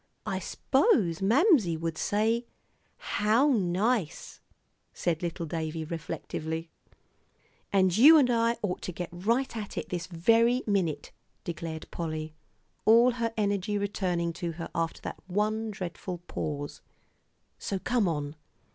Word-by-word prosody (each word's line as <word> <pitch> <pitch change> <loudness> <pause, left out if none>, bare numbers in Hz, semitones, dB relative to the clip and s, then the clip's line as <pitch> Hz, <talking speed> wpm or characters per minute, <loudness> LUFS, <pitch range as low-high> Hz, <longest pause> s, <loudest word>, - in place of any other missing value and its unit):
"I - - -2
s'pose 185 - +2
Mamsie 225 - +4
would 165 0 -3
say, 225 +7 0 0.5
'How 220 +8 +2
nice,'" 200 - 0 0.5
said 165 -2 -1
little 170 0 -3
David, 160 0 -4
reflectively. 160 0 -4 1.0
"And 185 -3 +3
you 295 +9 +9
and 280 -4 +5
I 230 0 +2
ought 185 -3 -2
to - - -4
get 175 0 -5
right 230 +9 0
at 210 -3 -6
it - - -4
this 175 -2 -3
very 230 +8 +3
minute," 175 -8 -1 0.3
declared 165 -1 -5
Polly, 155 -2 -4 0.5
all 235 +3 +6
her 230 -1 -2
energy 205 0 0
returning 180 -4 -1
to 170 -1 -2
her 165 +1 -7
after 165 -1 -2
that - - -6
one 215 +3 0
dreadful 185 -2 -5
pause, 145 -4 -5 0.8
"so 195 - -2
come 235 +1 +1
on." 145 -2 -2
185 Hz, 130 wpm, -28 LUFS, 165-225 Hz, 1.0 s, you